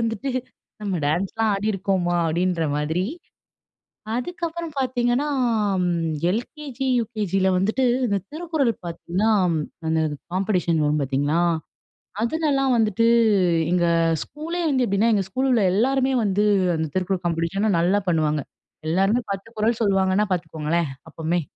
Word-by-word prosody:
வந்துட்டு 230 +3 -2 0.5
நம்ம 195 -4 -1
டான்ஸ்லாம் 195 +8 0
ஆடிருக்கோமா? 195 -3 0
அப்டின்ற 170 0 0
மாதிரி. 160 +5 -1 1.1
அதுக்கப்பறம் 335 +3 -4
பாத்தீங்கன்னா 250 +1 +1 1.1
LKG, 275 +2 -7 0.2
UKGல 200 -4 -1
வந்துட்டு 220 +8 +1 0.2
இந்த 200 -2 +1
திருக்குறள் 310 -6 0
பாத்தீங்கன்னா, 175 +5 -1 0.6
அந்த 160 0 +1 0.3
காம்பெடிஷன் 180 -4 +1
வரும் 150 +1 +1
பாத்தீங்களா, 145 +4 0 0.8
அதுலல்லாம் 275 0 +1
வந்துட்டு, 225 0 +2 0.6
எங்க 175 -1 +2 0.4
ஸ்கூலே 330 +4 -5
வந்து 260 -3 +2
எப்டின்னா, 200 +4 +2
எங்க 200 - +2
ஸ்கூல்ல 260 +6 0
உள்ள 225 -4 +3
எல்லாருமே 265 +5 +2
வந்து 205 0 +1 0.3
அந்த 160 0 -1
திருக்குறள் 185 0 -1
காம்பெடிஷன் 170 +4 0
நல்லா 185 +4 +2
பண்ணுவாங்க. 155 -3 +1 0.5
எல்லாருமே 195 +8 +2
10 195 +2 -4
குறள் 220 +2 +1
சொல்லுவாங்கன்னா 195 0 +2
பாத்துக்கோங்களேன் 160 -1 -1 0.2
அப்பமே. 165 +2 -1
195 Hz, 110 wpm, -23 LUFS, 175-245 Hz, 1.1 s, உள்ள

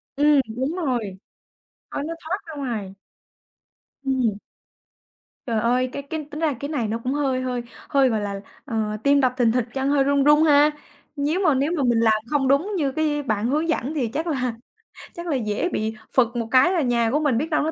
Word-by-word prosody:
Ừm, 290 0 +4
đúng 265 +7 -2
rồi. 245 - -2 0.7
Khói 285 - -3
nó 330 +2 -4
thoát 340 +5 -2
ra 320 - -8
ngoài. 225 -9 -4 1.1
Ừm. 255 -6 0 1.1
Trời 230 -3 0
ơi, 250 +3 +1
cái - - -4
cái 305 +2 -5
tính 300 - -6
ra 315 -3 +1
cái 285 - -4
này 265 -8 -1
nó 220 +2 -2
cũng 255 - -1
hơi 270 -3 0
hơi 250 -1 -2 0.3
hơi, 275 -2 +4
gọi 220 -3 0
là, 200 -1 -4 0.2
ờ, 220 -5 -2
tim 280 0 +4
đập 255 -2 +2
thình 235 -3 +3
thịch, 245 0 +1
chân 270 0 -1
hơi 280 -1 +3
run 280 0 +2
run 295 +2 +5
ha. 295 -1 +5 0.4
Nhíu 295 +5 0
mà 325 -7 +3
nếu 275 +4 +1
mà 285 - +1
mình 240 -2 +3
làm 225 -1 +4 0.2
không 285 -2 +1
đúng 280 +10 +2
như 285 -5 0
cái 295 0 -1
bạn 215 -5 -1
hướng 305 +5 0
dẫn 300 -2 -1
thì 275 -7 0
chắc 310 +9 -3
là 255 -7 -1 0.6
chắc 340 0 -7
là 310 - 0
dễ 220 +6 -1
bị 220 -7 -2 0.2
phựt 255 -3 +5
một 230 -2 -2
cái 260 +7 +5
là 360 -3 +1
nhà 235 -4 +1
của 295 - +2
mình 290 -6 +1
biết 305 +6 -1
đâu 305 -2 +1
nó 315 - -1
270 Hz, 215 wpm, -23 LUFS, 240-295 Hz, 1.1 s, run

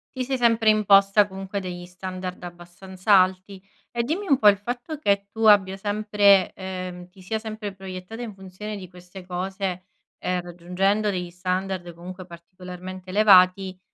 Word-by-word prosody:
Ti 255 - -2
sei 265 +1 -2
sempre 230 -2 +3
imposta 200 -1 +5
comunque 195 +1 -5
degli 180 -2 -7
standard 185 0 -7
abbastanza 180 +3 -3
alti. 185 +1 +2 0.3
E 235 -1 -1
dimmi 345 +10 -3
un 275 -5 +3
po', 210 - +5
il 200 -1 +7
fatto 245 - -5
che 200 -7 0
tu 225 0 -4
abbia 195 -3 +5
sempre, 205 -1 +3
ehm 185 -1 -7
ti 190 0 -18
sia 220 +4 -3
sempre 215 -2 -6
proiettata 190 +4 -8
in 225 -3 -7
funzione 195 +2 -8
di 185 -3 -9
queste 180 +1 -13
cose, 185 0 -4 0.3
ehm, 180 0 -2
raggiungendo 180 +4 -1
degli 180 -2 -4
standard 180 0 -3
comunque 180 +2 -10
particolarmente 180 +1 -10
elevati, 190 -2 +5
190 Hz, 155 wpm, -24 LUFS, 180-210 Hz, 0.3 s, il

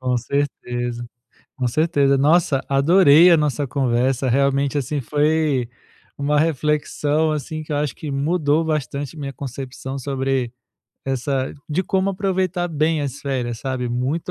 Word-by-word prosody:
Com 125 -1 0
certeza, 120 -2 -3 0.5
com 125 -2 0
certeza. 140 -1 +2
Nossa, 145 -1 +3
adorei 160 +4 +6
a 170 - +7
nossa 150 -1 0
conversa. 130 0 0
Realmente, 140 +2 +1
assim, 140 +2 -2
foi 150 -2 +1 0.5
uma 145 +1 +1
reflexão, 150 0 +1
assim, 155 +1 -4
que 155 - -7
eu - - 0
acho 145 -2 -1
que 150 - -6
mudou 150 +2 +1
bastante 145 -1 -3
minha 140 -2 -5
concepção 135 0 -6
sobre 135 -2 -2 0.5
essa 135 0 -1 0.2
de 165 +5 0
como 190 +1 0
aproveitar 185 -2 -1
bem 155 0 0
as 140 0 -5
férias, 125 -4 -3
sabe. 130 -2 -3
Muito 130 +7 -2
140 Hz, 140 wpm, -21 LUFS, 130-155 Hz, 0.5 s, a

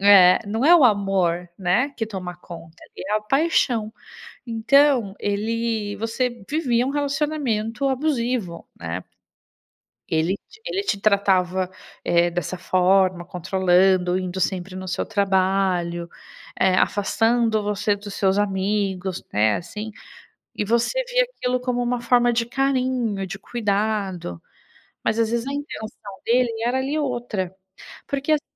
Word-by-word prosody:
É, 195 -2 +7
não 220 +5 -1
é 345 +4 +8
o 310 - +5
amor, 195 -5 +2
né, 190 +9 +2
que 225 - -2
toma 180 -4 -6
conta, 165 -2 -11 0.2
é 210 +3 -1
a - - -1
paixão. 240 -3 +1 0.5
Então, 240 -1 +3
ele 220 0 -1
você 235 +1 -2
vivia 250 -6 +1
um 265 - -1
relacionamento 280 -5 -1
abusivo, 250 - -1
né? 85 +2 -5 1.1
Ele 165 +4 +1
te 435 0 -18
ele 400 -5 -2
te 200 - -1
tratava, 190 -3 +2 0.3
eh, 175 0 +3
dessa 175 +1 -3
forma, 185 0 +2
controlando, 180 0 +2
indo 185 0 -4
sempre 185 0 -2
no 185 0 -6
seu - - -2
trabalho, 185 -3 0 0.5
eh, 190 -1 +4
afastando 225 +3 +2
você 205 0 0
dos 205 0 -9
seus 195 0 +2
amigos, 195 -2 -1
né, 105 +1 +3
assim. 210 +5 -7 0.6
E - - -1
você 235 - +1
via - - +3
aquilo 255 - -2
como 250 -1 -1
uma 245 0 0
forma 240 0 +3
de 230 0 +1
carinho, 255 -5 0
de 195 +2 -6
cuidado, 200 - -2 0.6
mas 220 - +1
às 225 -1 +2
vezes 235 +1 -1
a 275 - -3
intenção 220 -8 -7
dele 245 +1 +3 0.2
era 255 +2 +1
ali 280 +4 -1
outra, 240 - -2 0.5
porque, 280 +2 -1
assim, 300 0 +2
210 Hz, 135 wpm, -23 LUFS, 185-245 Hz, 1.1 s, é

